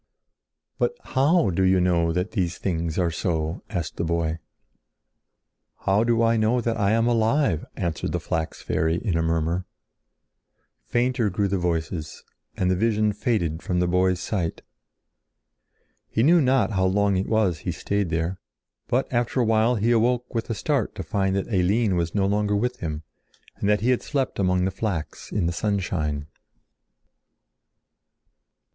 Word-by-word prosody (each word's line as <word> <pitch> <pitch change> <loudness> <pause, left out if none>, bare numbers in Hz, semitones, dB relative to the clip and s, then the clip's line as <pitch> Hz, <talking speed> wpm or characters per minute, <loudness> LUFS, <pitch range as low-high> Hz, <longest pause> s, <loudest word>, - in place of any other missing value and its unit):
"But 480 - +1
how 135 - +2
do 90 - -1
you 95 0 +4
know 85 -2 +2
that 90 +4 -1
these 90 -5 -1
things 85 -3 -2
are 85 -3 +1
so?" 80 0 -2
asked 85 -6 -4
the - - -1
boy. 85 -1 -1 1.4
"How 100 +3 +2
do 115 0 +2
I 115 0 +3
know 110 +3 +2
that 115 -1 -1
I 100 -2 +1
am 115 0 +2
alive?" 115 - +1
answered 85 -4 -2
the - - -1
flax 80 0 -3
fairy 80 +1 0
in 90 0 -1
a 85 - +2
murmur. 85 +2 0 1.2
Fainter 120 - +1
grew 100 +2 0
the 95 -1 -1
voices 80 -3 -3 0.3
and 90 0 +1
the - - +2
vision 110 +1 +1
faded 100 -7 -1
from 90 -1 -1
the 90 - +2
boy's 90 +1 +2
sight. 90 -6 -3 1.5
He 110 - +1
knew 170 +4 +6
not 130 -3 +2
how 95 -2 +1
long 100 +1 +2
it 95 +1 -1
was 105 -8 +2
he - - -3
stayed 100 -3 -1
there, 85 +3 -2 0.5
but 130 +3 +1
after 120 +2 0
awhile 115 0 +3
he 115 +2 +1
awoke 120 +1 +1
with 115 0 -2
a 115 - -1
start 140 0 -1
to - - -5
find 95 -3 0
that 100 +3 -2
Eline 100 +2 +2
was 85 0 -1
no 100 -2 +2
longer 105 +1 +1
with 125 +4 -1
him, 80 -2 -4 0.5
and 100 - -1
that 105 -1 +3
he 125 +3 +2
had 125 - +1
slept 135 -7 -2
among 90 -1 +2
the 95 - 0
flax 95 -5 -4
in 100 -4 0
the 85 - 0
sunshine. 85 -8 -1
95 Hz, 165 wpm, -24 LUFS, 85-115 Hz, 1.5 s, knew